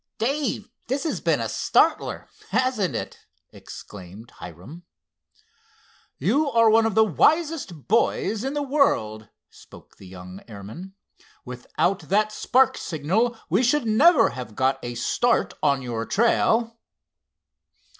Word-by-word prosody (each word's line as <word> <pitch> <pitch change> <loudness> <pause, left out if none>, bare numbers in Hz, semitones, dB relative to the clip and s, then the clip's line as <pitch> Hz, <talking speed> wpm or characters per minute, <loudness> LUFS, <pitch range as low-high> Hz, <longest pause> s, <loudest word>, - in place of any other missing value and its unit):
"Dave, 260 -3 -2 0.2
this 270 +3 -2
has 320 - -3
been - - +1
a - - -2
startler; - - +1 0.2
hasn't 220 - 0
it?" - - -5 0.3
exclaimed 100 +4 -12
Hiram. 90 - -11 1.4
"You 270 - +1
are 230 -3 +4
one 225 0 +4
of 220 - -3
the 220 - +6
wisest 290 - 0
boys 220 0 +1
in 270 +2 -3
the 290 - -1
world," 110 - 0 0.2
spoke - - -17
the 95 - -14
young 90 +1 -11
airman. 110 - -10 0.5
"Without 125 +9 -2
that 210 +2 +2
spark 255 +4 +2
signal 190 +10 -1
we 185 +7 +1
should 255 +2 +1
never 285 +10 +5
have 125 -5 -8
got 130 +2 +1
a 120 0 -6
start 240 - 0
on 140 -2 +1
your 115 -2 -4
trail." 230 +1 +1
205 Hz, 125 wpm, -23 LUFS, -, 1.4 s, the